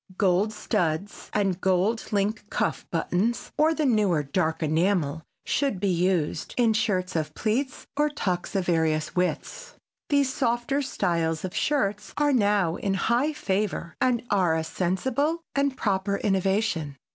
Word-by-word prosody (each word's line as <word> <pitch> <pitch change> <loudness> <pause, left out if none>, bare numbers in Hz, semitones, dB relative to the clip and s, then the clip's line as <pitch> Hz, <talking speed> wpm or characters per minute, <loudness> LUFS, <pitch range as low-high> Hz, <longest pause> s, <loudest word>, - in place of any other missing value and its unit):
Gold 195 +2 +2
studs 175 -1 -2
and 195 -3 0
gold 190 +5 +1
link 210 +1 -1
cuff - - -1
buttons, 180 +7 -1
or 310 +2 +4
the 310 - 0
newer 205 - +2
dark 160 +2 -1
enamel 160 -1 +1 0.2
should 275 -9 0
be 200 +1 +1
used, 175 -3 0
in 235 -3 +4
shirts 190 -5 0
of 155 -2 -2
plaits 250 +5 -1
or 295 +1 +2
tucks 185 -11 -3
of 190 -2 +1
various 160 -3 +1
widths. - - -2 0.3
These 280 -2 +2
softer 245 +1 0
styles 165 - -1
of 185 - -6
shirts 210 -8 0
are 290 -1 +3
now 205 -7 +2
in 195 -1 -1
high 240 +9 +1
favor 195 - -2
and 245 -2 +2
are 185 -5 +3
a 160 - 0
sensible 260 - -1
and 280 -1 0
proper 200 -2 0
innovation. 190 -7 0
200 Hz, 145 wpm, -26 LUFS, 175-240 Hz, 0.3 s, or